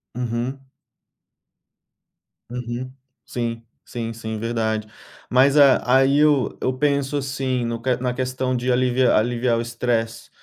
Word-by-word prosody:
Uhum. 125 +3 -3 1.8
Uhum, 125 +1 -5 0.4
sim, 115 -1 -3 0.2
sim, 115 -1 -5
sim 110 -1 -5
verdade. 110 -1 -1 0.4
Mas 135 +3 +4
a 140 -2 +6 0.2
aí 135 +1 +3
eu 150 -3 +3
eu - - +1
penso 140 0 +1
assim 135 -3 -2
no 115 0 -3 0.2
na 125 0 -1
questão 130 0 -2
de 125 +1 0
aliv 125 0 +1
aliviar 120 +1 +2
o 115 - 0
estresse, 115 -1 -2
125 Hz, 120 wpm, -22 LUFS, 115-130 Hz, 1.8 s, a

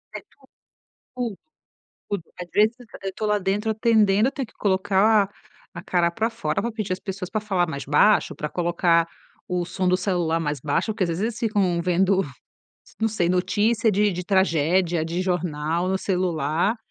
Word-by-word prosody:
É - - -5
tudo, - - -39 0.9
tudo, 235 -6 -3 0.7
tudo. 200 -5 -2 0.2
Às 175 - -6
vezes 215 +3 +3
eu 245 - -13 0.2
eu 190 -1 -3
tô 215 - -4
lá 210 0 +2
dentro 205 +3 0
atendendo 220 -1 +3
eu - - -15
tenho 275 -3 -4
que - - -23
colocar 200 +1 +2 0.4
a 170 0 -8
cara 175 -3 +2
pra 225 +6 -1
fora 230 0 -2
pra 235 - -2
pedir 215 -4 -3
às 185 - -6
pessoas 190 -2 -6
pra 215 -1 -2
falar 190 -5 0
mais 140 -4 -5
baixo, 180 +9 +3
pra 150 - -3
colocar 170 -1 +2 0.4
o 180 -1 -1
som 185 +1 -2
do 180 0 +3
celular 175 -4 0
mais 150 -3 -2
baixo, 170 +9 0
porque 205 - -1
às 170 - -1
vezes 165 +4 -2
eles 225 0 -2
ficam 195 -6 +1
vendo, 185 +2 +2 0.8
não 225 - +2
sei, 180 -5 0
notícia 210 +5 +2
de 205 0 +2
de 180 0 -5
tragédia 175 -2 +2
de 170 +3 -2
jornal 170 -1 -1
no 190 - +1
celular 180 +1 0
190 Hz, 185 wpm, -24 LUFS, 175-210 Hz, 0.9 s, vezes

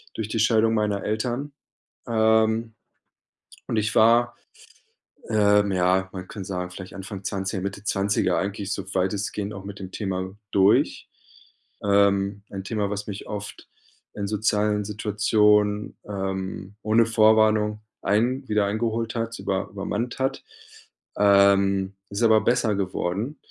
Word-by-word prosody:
durch 110 -1 -4
die 110 - -2
Scheidung 110 0 +3
meiner 105 -3 0
Eltern. 120 +6 -2 0.6
Ähm, 110 0 +2 0.9
und - - -2
ich 110 +1 0
war, 120 +2 +4 0.9
ähm, 105 -1 +3
ja, 95 +1 +2
man 95 -1 -7
kann 100 -4 -7
sagen, 90 -2 -4
vielleicht 95 0 -9
Anfang 100 0 -8
20, 95 0 -3
Mitte 100 +1 -5
20er 100 -2 +1
eigentlich 100 0 -3
so 100 - -4
weitestgehend 100 +2 -1
auch 95 -1 -9
mit 100 0 -8
dem 95 -1 -8
Thema 95 -2 -4 0.2
durch. 100 +1 +3 0.7
Ähm, 100 0 +2
ein 95 -1 -5
Thema, 105 0 -2
was 105 0 -4
mich 100 -2 -7
oft 105 -1 -7 0.4
in 100 - -4
sozialen 105 0 +1
Situationen, 105 0 +2
ähm, 95 0 -4
ohne 110 +2 +3
Vorwarnung 110 -1 +3 0.2
ein 125 +6 0
wieder 105 -1 +2
eingeholt 115 +2 -1
hat, 115 0 -3
über 95 -1 -2
übermannt 105 +4 -3
hat. 130 0 -1 0.7
Ähm, 100 -1 +4 0.2
ist 100 +3 -2
aber 110 -1 +5
besser 120 0 +2
geworden. 100 +7 -2
105 Hz, 130 wpm, -24 LUFS, 100-110 Hz, 0.9 s, aber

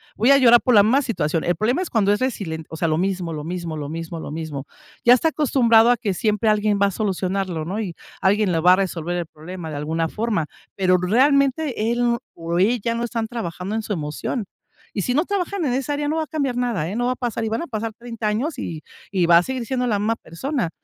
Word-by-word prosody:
voy 235 +5 +2
a 275 - +8
llorar 240 -2 +7
por 250 - +3
la 205 - +8
más 265 +6 +3
situación". 165 -8 -1
El 175 -1 +1
problema 245 - +1
es 370 - -3
cuando 205 -3 +2
es 205 - -1
resilen 185 -11 -3
o - - -7
sea, 165 - 0
lo 155 - +1
mismo, 180 -2 -1
lo 150 -1 -5
mismo, 170 -2 -4
lo 145 -1 -4
mismo, 165 +1 -5
lo 145 - -7
mismo. 150 -3 -5 0.4
Ya 240 - +8
está 290 +6 +3
acostumbrado 240 -7 +4
a 245 - +5
que 210 -4 -1
siempre 215 +3 +1
alguien 210 -1 +2
va 200 - +5
a - - -2
solucionarlo, 185 -3 -2
¿no?, 195 +6 -3
y 185 -6 -4 0.3
alguien 200 0 +3
le 165 - +1
va 180 +2 +6
a - - +6
resolver 175 -3 -2
el 175 - -2
problema 160 +2 -8
de 150 - -5
alguna 160 +2 -1
forma, 215 -7 -1 0.3
pero 185 -2 +3
realmente 265 - +2
él 240 0 +1 0.2
o 170 +1 -2
ella 230 +3 +2
no 235 - -2
están 230 -1 -3
trabajando 195 -4 -5
en 225 - 0
su 210 - -3
emoción. 155 - -3 0.5
Y 200 - 0
si 250 - 0
no 305 +5 +2
trabajan 395 -2 -2
en 250 - 0
esa 270 +2 -1
área, 290 0 -2
no 315 +2 0
va 320 - +1
a - - -8
cambiar 280 -6 -1
nada, 230 -11 -1
¿eh?, 200 - -4
no 245 +1 0
va 255 - +1
a - - -11
pasar 235 -3 -3
y - - -1
van 225 +8 -2
a - - -7
pasar 225 -2 -4
30 235 -2 -5
años, 255 +7 -1
y 160 -2 -5 0.3
y 185 -3 +2
va 170 0 +7
a 175 - +4
seguir 255 0 -4
siendo 250 +1 -1
la 210 -3 +1
misma 220 +2 +1
persona, 235 - -3
210 Hz, 255 wpm, -22 LUFS, 175-245 Hz, 0.5 s, a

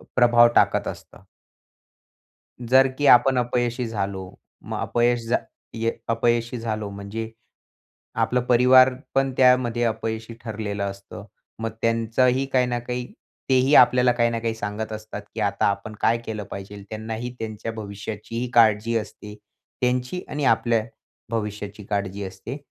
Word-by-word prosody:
प्रभाव 120 -1 +6
टाकत - - +3
असतं. - - -9 1.4
जर 130 +2 +5
की 145 - +1
आपण 130 +2 +3
अपयशी 120 0 -1
झालो, 100 -3 -3 0.4
मग - - -5
अपयश, 120 0 +1
जा 120 - +3 0.4
ये 115 0 -1 0.2
अपयशी 115 +1 0
झालो, 110 -2 -3
म्हणजे 100 +3 -6 0.9
आपलं 125 - +1
परिवार 130 +1 +6 0.2
पण 135 0 +2
त्यामध्ये 125 -2 +3
अपयशी 110 0 -3
ठरलेलं 105 -3 -4
असतं. 100 0 -7 0.4
मग 115 0 -2
त्यांचंही 115 +3 +2
काही 125 -1 +3
ना 120 -1 -1
काही 125 +1 -4 0.4
तेही 130 +2 +4
आपल्याला 125 -1 +6
काही 120 -1 +1
ना 115 - -2
काही 115 0 -2
सांगत 110 0 -5
असतात, 110 -1 -7
की - - -4
आता 100 -1 +1
आपण 100 +2 -2
काय 115 +1 +3
केलं 110 -2 -4
पाहिजे. 100 +1 -8
त्यांनाही 110 +2 -5
त्यांच्या 110 0 -5
भविष्याचीही 110 +3 -6
काळजी 115 0 +4
असते, 105 -1 -9 0.5
त्यांची 125 +7 -1
आणि 145 -1 -3
आपल्या 115 -1 +2 0.5
भविष्याची 105 -2 -4
काळजी 100 -1 -3
असते. 95 +7 -7
115 Hz, 135 wpm, -23 LUFS, 105-125 Hz, 1.4 s, प्रभाव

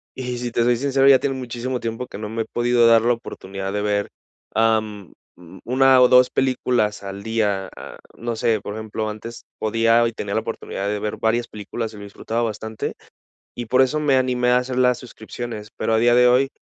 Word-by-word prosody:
y 125 -1 -4
si 120 -1 -4
te 115 - +1
soy 120 0 +3
sincero 135 +1 +2
ya 135 -2 +7
tienen 135 -2 -2
muchísimo 125 +1 -4
tiempo 115 +2 -4
que - - -9
no 105 0 -5
me 115 0 -3
he - - -14
podido 120 0 +2
dar 115 -1 +6
la 120 +1 +3
oportunidad 95 -4 -6
de 105 - -1
ver, 105 -1 -1 0.5
am, 110 -4 0 0.5
1 130 +1 +5
o 125 - +6
2 125 0 +6
películas 125 -5 0
al 100 +1 -7
día, 105 -4 -1
a, - - -10 0.2
no 120 0 -3
sé 115 -3 +1
por 105 - -6
ejemplo 110 0 -4
antes 115 +2 -8
podía 115 +2 +3
y - - -3
tenía 100 -2 -5
la 110 - +1
oportunidad 100 -3 -5
de 105 0 -2
ver 105 0 -3
varias 115 +2 0
películas 110 +2 -6
y - - -11
lo 100 - -9
disfrutaba 110 +3 -4
bastante 110 0 -4 0.6
y 120 -1 -5
por 130 +3 +4
eso 150 +4 +1
me 140 -3 +3
animé 125 -1 +1
a 125 - +5
hacer 125 0 -3
las 125 -1 +3
suscripciones 115 -2 -8
pero 110 - 0
a - - +3
día 120 +1 +4
de 125 0 +6
hoy, 130 +2 +3
115 Hz, 215 wpm, -22 LUFS, 110-125 Hz, 0.6 s, ya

